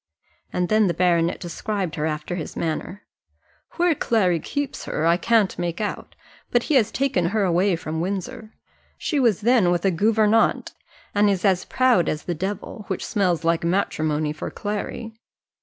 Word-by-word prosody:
And 180 Hz, 0 st, 0 dB
then 215 Hz, 0 st, +3 dB
the 170 Hz, -, -1 dB
baronet 170 Hz, -1 st, +2 dB
described 185 Hz, 0 st, -3 dB
her 155 Hz, 0 st, -1 dB
after 155 Hz, +2 st, -4 dB
his 170 Hz, -4 st, -5 dB
manner. 170 Hz, +5 st, -3 dB, 0.7 s
"Where 350 Hz, -1 st, +2 dB
Clary 195 Hz, -, +1 dB
keeps 285 Hz, -, -4 dB
her 155 Hz, -, -2 dB
now, -, -, +3 dB
I 170 Hz, -, +5 dB
can't 215 Hz, -2 st, +2 dB
make 175 Hz, -1 st, -2 dB
out; 210 Hz, -1 st, -4 dB, 0.3 s
but 240 Hz, -1 st, +2 dB
he -, -, -1 dB
has 235 Hz, -6 st, +4 dB
taken 270 Hz, -10 st, 0 dB
her 205 Hz, +4 st, +1 dB
away 185 Hz, +1 st, +2 dB
from 160 Hz, 0 st, -4 dB
Windsor. 195 Hz, +4 st, -4 dB, 0.5 s
She 300 Hz, -, -1 dB
was 230 Hz, -6 st, +2 dB
then 230 Hz, -5 st, +4 dB
with 175 Hz, +1 st, 0 dB
a 195 Hz, -, +4 dB
gouvernante, 215 Hz, +4 st, +2 dB, 0.4 s
and 205 Hz, 0 st, +4 dB
is 195 Hz, -1 st, 0 dB
as 190 Hz, -2 st, +2 dB
proud 250 Hz, -10 st, +2 dB
as 155 Hz, -, -3 dB
the 175 Hz, -, -2 dB
devil, 200 Hz, +4 st, -5 dB
which 190 Hz, -, -3 dB
smells 180 Hz, -5 st, 0 dB
like 165 Hz, 0 st, +1 dB
matrimony 155 Hz, -4 st, 0 dB
for 155 Hz, -, -5 dB
Clary." 210 Hz, +2 st, -5 dB
190 Hz, 175 wpm, -23 LUFS, 170-215 Hz, 0.7 s, I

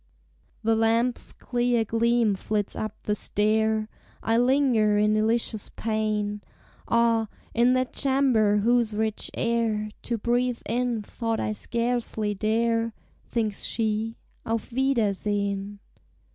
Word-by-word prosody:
The 225 Hz, +1 st, +3 dB
lamp's 230 Hz, +2 st, +1 dB
clear 240 Hz, -2 st, 0 dB
gleam 230 Hz, 0 st, +2 dB
flits 205 Hz, +1 st, -2 dB
up 215 Hz, -1 st, -4 dB
the 210 Hz, -, 0 dB
stair; 215 Hz, +1 st, +1 dB, 0.4 s
I 225 Hz, -, +2 dB
linger 245 Hz, -4 st, +3 dB
in 210 Hz, 0 st, +3 dB
delicious 220 Hz, 0 st, 0 dB
pain; 215 Hz, -2 st, -1 dB, 0.5 s
Ah, 230 Hz, -1 st, +3 dB, 0.3 s
in 240 Hz, +2 st, +4 dB
that 255 Hz, 0 st, 0 dB
chamber, 260 Hz, -7 st, +3 dB
whose 230 Hz, 0 st, +2 dB
rich 220 Hz, 0 st, -2 dB
air 225 Hz, -2 st, 0 dB
To 235 Hz, -, -2 dB
breathe 240 Hz, +2 st, 0 dB
in 235 Hz, -1 st, -1 dB
thought 225 Hz, +1 st, -3 dB
I 215 Hz, -, -1 dB
scarcely 230 Hz, -2 st, -1 dB
dare, 230 Hz, +2 st, 0 dB, 0.3 s
Thinks 220 Hz, -4 st, -2 dB
she, 220 Hz, 0 st, -1 dB, 0.3 s
"Auf 225 Hz, +1 st, -3 dB
wiedersehen!" 205 Hz, -5 st, 0 dB
225 Hz, 115 wpm, -26 LUFS, 215-235 Hz, 0.5 s, in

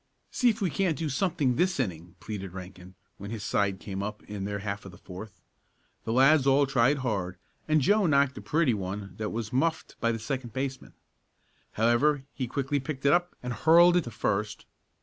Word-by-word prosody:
"See 250 Hz, -, +3 dB
if 225 Hz, -1 st, -2 dB
we 185 Hz, -5 st, +1 dB
can't 170 Hz, +1 st, 0 dB
do 160 Hz, -2 st, -2 dB
something 140 Hz, -5 st, 0 dB
this 180 Hz, -2 st, +1 dB
inning!" 90 Hz, -7 st, -3 dB
pleaded 100 Hz, -3 st, -6 dB
Rankin 95 Hz, 0 st, -10 dB, 0.2 s
when 100 Hz, +1 st, -7 dB
his 110 Hz, -2 st, -5 dB
side 100 Hz, -2 st, 0 dB
came 100 Hz, -2 st, -5 dB
up 105 Hz, +1 st, -5 dB
in 105 Hz, -2 st, -6 dB
their 100 Hz, 0 st, -3 dB
half 100 Hz, 0 st, -4 dB
of 95 Hz, -, -10 dB
the 90 Hz, -, -14 dB
fourth. 95 Hz, +3 st, -10 dB, 0.7 s
The 110 Hz, -, -2 dB
lads 135 Hz, +3 st, +5 dB
all 140 Hz, +1 st, +5 dB
tried 135 Hz, +1 st, +3 dB
hard 95 Hz, -6 st, -2 dB, 0.3 s
and 155 Hz, -1 st, +3 dB
Joe 205 Hz, +7 st, +3 dB
knocked 140 Hz, -2 st, +3 dB
a -, -, -7 dB
pretty 155 Hz, -5 st, +2 dB
one 100 Hz, -1 st, -5 dB
that 110 Hz, -1 st, -3 dB
was 110 Hz, 0 st, -4 dB
muffed 160 Hz, +5 st, -1 dB
by 115 Hz, -, +1 dB
the 115 Hz, -, -2 dB
second 120 Hz, 0 st, -4 dB
baseman. 130 Hz, 0 st, -4 dB, 0.8 s
However, 125 Hz, +6 st, +2 dB
he 130 Hz, -, -3 dB
quickly 140 Hz, +3 st, -1 dB
picked 135 Hz, 0 st, -6 dB
it 140 Hz, -, +6 dB
up 175 Hz, 0 st, +1 dB
and 125 Hz, 0 st, -3 dB
hurled 170 Hz, +6 st, +6 dB
it 180 Hz, -, +2 dB
to -, -, -5 dB
first. 105 Hz, -1 st, -2 dB
125 Hz, 200 wpm, -28 LUFS, 100-145 Hz, 0.8 s, it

